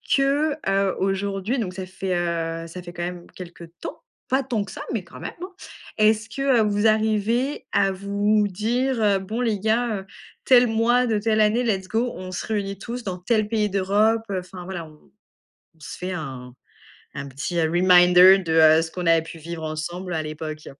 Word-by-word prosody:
que, 285 +2 +1
heu, 195 -1 +1
aujourd'hui 195 +5 -1
donc 185 -5 -3
ça 190 -1 -6
fait, 185 0 -3
heu, 165 -1 -2
ça 180 +2 -8
fait 175 0 -10
quand 175 0 -5
même 175 0 -6
quelque 170 -2 -10 0.2
temps - - -7 0.3
pas 265 +1 +2
tant 230 -5 -1
que 190 - -10
ça - - -8
mais 210 -5 -2
quand 175 - -13
même, - - -6
hein. 370 - -7 0.5
Est-ce 215 0 +3
que 270 -2 +2
vous 210 +1 +2
arrivez 220 +5 0
à 195 -1 +3
vous 205 +2 +1
m - - 0
dire: 220 +1 0
«Bon 220 +6 -4
les 220 -4 0
gars, 220 +1 0
heu, - - -15 0.4
tel 250 -2 +6
mois 235 +3 +2
de 220 -2 +1
telle 215 0 +1
année, 220 +4 +3
let's 190 -5 -1
go 235 +3 0
on 185 0 -7
se 180 - -4
réunit 200 -3 -2
tous 240 +3 -6
dans 185 -3 -4
tel 215 +2 +1
pays 215 -2 +1
d'Europe, 205 +4 +2
heu»? 185 - -1
Enfin 180 0 -10
voilà. 175 -3 -6
On 155 -1 -20 0.7
on - - -28
se 145 - -9
fait 180 +1 -4
un 130 -7 -6 0.6
un 140 0 -5
petit 140 +6 -2
reminder 180 +2 +6
de, 175 -4 -5
heu, 160 0 +6
ce 160 - -5
qu'on 180 0 -5
avait 165 -1 +4
pu 165 0 -10
vivre 165 +1 -7
ensemble 175 +4 -5
à 160 - -1
l'époque. 155 0 -7
195 Hz, 200 wpm, -23 LUFS, 175-220 Hz, 0.7 s, tel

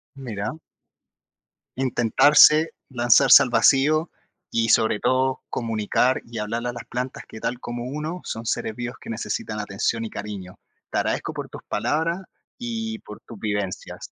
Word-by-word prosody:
Mira. 120 +2 -5 1.2
Intentarse, 145 +5 +5 0.2
lanzarse 120 +1 +6
al 125 - -2
vacío 155 +6 +4 0.4
y 115 -1 +1
sobre 110 -1 +4
todo 130 +3 +1
comunicar, 115 +2 0
y 115 -1 -8
hablarle 115 +3 -2
a - - -7
las 120 -1 -8
plantas, 125 +2 -4
que 110 - -9
tal 125 - -3
como 120 -1 -5
uno 150 +6 -4
son 115 - -5
seres 110 -1 -2
vivos 120 +1 -5
que - - -12
necesitan 110 -1 -3
atención 105 +3 -1
y 110 - -5
cariño. 100 -3 -7 0.3
Te - - -1
agradezco - - -1
por - - -6
tus - - -10
palabras 165 +4 0 0.4
y 225 -2 -4
por 105 - -11
tus 115 - -12
vivencias. 100 -3 -4
120 Hz, 150 wpm, -24 LUFS, 110-140 Hz, 1.2 s, lanzarse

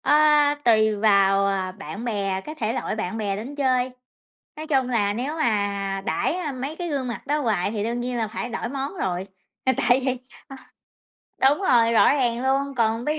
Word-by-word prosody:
Ơ, 275 - +1 0.5
tùy 220 -2 +4
vào, 200 -2 +4
ờ, 190 -2 -1
bạn 200 +3 -8
bè, 195 -4 -1
cái 305 +9 -8
thể 225 -6 -2
loại 245 - -3
bạn 215 -1 -3
bè 205 -3 -1
đến 235 +8 -7
chơi, 255 -2 +1 0.7
nói 310 +1 -6
chung 270 -5 +1
là 205 -4 +1
nếu 260 +8 -3
mà 200 -7 -1
đãi, 160 - 0
a, 345 -5 -3
mấy 270 +4 -5
cái 350 0 -4
gương 275 -5 -2
mặt 235 - -6
đó 295 +2 0
hoài 210 -8 0
thì 210 -2 -3
đương 235 +2 -2
nhiên 245 0 -3
là 225 -2 -1
phải 225 +2 -5
đổi 235 0 -3
món 275 +6 -4
rồi, 185 - -2 0.4
là 260 - +5
tại 245 +2 +3
vì, 260 -1 0 1.2
ờ, 265 - +6
đúng 290 - 0
rồi, 230 -7 +4
rõ 230 - +5
ràng 245 -4 0
luôn, 275 +1 0
còn 230 -1 0
ví 300 +2 -1
235 Hz, 205 wpm, -24 LUFS, 205-270 Hz, 1.2 s, ờ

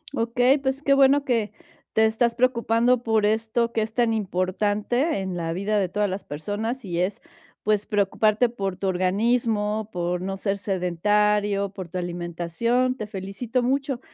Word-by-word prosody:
Okey, 245 +3 +3
pues, 270 0 -2
que 280 - +4
bueno 275 +1 +4
que 230 -5 0 0.4
te 220 0 +4
estás 235 +2 +2
preocupando 240 0 +2
por 220 -2 +2
esto 225 +2 0
que 225 - +1
es 220 0 -3
tan 235 -2 +2
importante, 205 - 0
en 190 -1 -4
la 165 -1 -2
vida 200 +4 -1
de 190 - 0
todas 205 +2 0
las 190 +2 -4
personas, 210 - -4
y 175 -2 -3
es, 190 +3 -2 0.4
pues, 210 -1 +1
preocuparte 215 +3 +2
por 195 -5 -4
tu 195 - -2
organismo, 210 +3 0
por 175 0 -2
no 195 +1 -3
ser 195 0 -1
sedentario, 200 +2 +1
por 185 -3 -7
tu 180 - -5
alimentación, 175 +8 -1
te 215 - -5
felicito 210 +5 -3
mucho, 270 0 0
210 Hz, 160 wpm, -24 LUFS, 190-235 Hz, 0.4 s, que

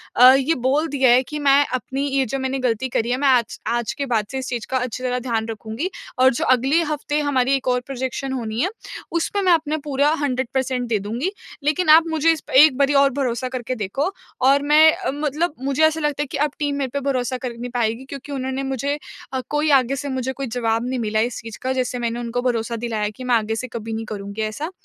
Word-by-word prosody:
अ, 255 +1 +9
ये 275 +4 +2
बोल 275 +6 +1
दिया 265 -3 +2
है 255 +2 +5
कि 300 +3 -6
मैं 280 0 +5
अपनी 265 +2 -2
ये 270 -1 +1
जो 270 +3 -3
मैंने 265 0 -2
गलती 250 0 0
करी 235 0 -1
है 250 - +1
मैं 280 0 +1
आज 245 -4 +2
आज 235 -2 0
के 280 -1 -3
बाद 225 -5 0
से 265 - -3
इस 260 - -4
चीज़ 240 -3 -3
का 260 - +1
अच्छी 250 0 -3
तरह 250 0 0
ध्यान 230 -3 -2
रखूँगी 225 - -4 0.3
और 260 0 +6
जो - - -2
अगले 270 +7 +3
हफ़्ते 300 -1 -2
हमारी 270 -2 +1
एक 265 -1 -4
और 250 0 +2
प्रोजेक्शन 265 0 -4
होनी 225 -3 -3
है 370 - +1 0.5
उसपे 400 +4 0
मैं 370 -2 +3
अपना 310 -1 0
पूरा 285 0 +2
100% 260 -2 -1
दे 220 - +2
दूँगी। 235 - -3 0.3
लेकिन 310 +3 +1
आप 320 +2 +7
मुझे 320 0 +3
इस 320 - -2
प - - -8
एक 290 -2 +7
बारी 280 0 +3
और 275 0 +5
भरोसा 255 -2 -1
करके 255 0 -4
देखो 250 - -2 0.4
और 280 +1 +5
मैं 305 +2 +6
अ, - - -3
मतलब 300 +3 -1
मुझे 275 +3 +1
ऐसा 315 0 +1
लगता 295 0 0
है - - -7
कि - - -2
अब 295 0 +1
टीम 290 -1 0
मेरे 270 -2 -2
पे 280 - 0
भरोसा 255 -1 -1
कर 250 -2 -5
नहीं 245 +1 -5
पाएगी 235 +2 -1
क्योंकि 280 +1 -9
उन्होंने 265 0 -3
मुझे 270 +2 -2 0.4
अ, 260 - -1
कोई 295 +1 +1
आगे 260 +2 -2
से 285 0 -4
मुझे 260 0 -2
कोई 275 0 -5
जवाब 230 0 0
नहीं 255 -1 -2
मिला 215 -1 0
इस - - -6
चीज़ 225 -1 -9
का 260 +1 -1
जैसे 250 -1 -2
मैंने 235 0 -2
उनको 240 +1 -2
भरोसा 235 -2 -1
दिलाया 215 -3 -1
कि 255 - -7
मैं 250 -1 +2
आगे 220 0 0
से 255 +3 -4
कभी 225 -1 -6
नहीं 225 0 -4
करुँगी 200 +1 -6
ऐसा। 275 - -3
260 Hz, 240 wpm, -21 LUFS, 240-285 Hz, 0.5 s, अ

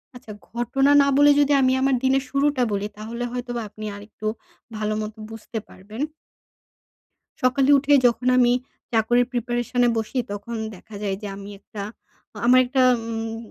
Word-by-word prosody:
আচ্ছা 245 -3 -11 0.2
ঘটনা 270 +4 +1
না 280 - +3
বলে 290 0 +7
যদি 290 0 +4
আমি 260 0 +3
আমার 270 -1 +3
দিনের 265 +1 +2
শুরুটা 280 -2 +1
বলি 200 +1 -1
তাহলে 230 +3 -5
হয়তো 245 0 -5
বা - - -2
আপনি 215 +1 -9
আরেকটু 210 +1 -8 0.5
ভালো 215 0 -1
মতো 215 +1 -6
বুঝতে 225 0 -6
পারবেন। 210 +7 -10 1.4
সকালে 265 +2 +3
উঠে 290 +1 +1
যখন 245 +1 0
আমি 245 -1 +5 0.4
চাকরির 240 +2 +3
প্রিপারেশন-এ 240 0 0
বসি 225 +4 -3
তখন 205 +3 -6 0.2
দেখা 205 +3 -14
যায় 195 -2 -1
যে - - -4
আমি 200 0 -9
একটা 205 0 -8 0.6
আমার 255 +1 +7
একটা 260 +1 +1 0.3
উম 225 0 -4
240 Hz, 155 wpm, -23 LUFS, 215-260 Hz, 1.4 s, বলে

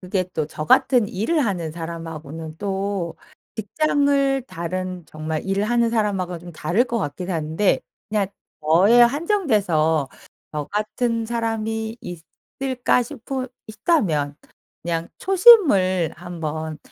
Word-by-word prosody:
그게 185 0 -1
또 155 -2 -1
저 155 0 -6
같은 230 - +4
일을 265 - 0
하는 175 -6 -2
사람하고는 160 -2 -7
또 195 -3 -2 0.4
직장을 275 +3 +1
다른 185 0 -4
정말 155 0 -4
일을 195 +1 0
하는 235 +1 +2
사람하고는 195 -6 -1
좀 175 0 -10
다를 175 +10 +1
것 235 -2 -2
같기는 180 +2 -4
한데 160 +5 +1 0.3
그냥 210 -2 +1 0.3
저에 180 +10 +5
한정돼서 215 - +2 0.4
'저 150 -1 -2
같은 230 +2 -1
사람이 225 -1 -2
있을까.' 250 - -2
싶으 255 +1 -5 0.2
있다면 170 - 0 0.5
그냥 170 0 -2
초심을 305 - +5
한번 160 -3 -5
195 Hz, 250 characters per minute, -22 LUFS, 165-235 Hz, 0.5 s, 저에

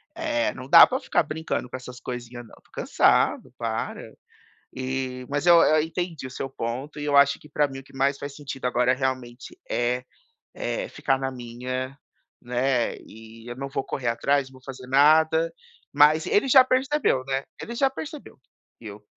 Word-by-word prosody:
eh, 310 -3 -1
não 130 +1 -10
dá 165 +2 +10
pra 260 - -2
ficar - - +1
brincando 160 -5 -4
com 130 - -5
essas 125 0 -10
coisinhas, 120 -1 -7
não. - - -16
Estou - - -25
cansado. - - +2
Para. - - -4 0.6
E, 130 0 -4
mas 145 +3 -1
eu 170 -1 +8
eu 155 0 +4
entendi 165 -2 -4
o - - -9
seu 135 +1 -5
ponto 130 +5 -5
e - - -4
eu 145 -1 +1
acho 140 0 +5
que, 150 - -16
pra 150 -1 +1
mim, 135 0 -8
o - - -17
que 135 - -20
mais 140 +1 +1
faz 145 -1 -7
sentido 135 -3 -6
agora 125 0 +2
realmente 130 -2 -4
é 120 +1 0 0.5
é - - -3
ficar 135 - 0
na 135 0 -2
minha, 130 +2 -5 0.5
né? 125 0 0
E 115 +1 -13
eu 120 - -5
não 135 +1 -5
vou 135 - -3
correr 125 -3 -3
atrás. 135 +4 +1
Não 130 - -20
vou 130 - -16
fazer 130 -1 -9
nada. 160 +4 +4 0.4
Mas 150 +2 +5
ele 240 +6 +2
já 260 0 +8
percebeu, 260 - +1
né? 135 0 -2 0.2
Ele 235 - -6
já 270 +2 +3
percebeu 300 +2 -9 0.4
que 115 - -12
eu 105 +1 -11
135 Hz, 190 wpm, -25 LUFS, 125-155 Hz, 0.6 s, dá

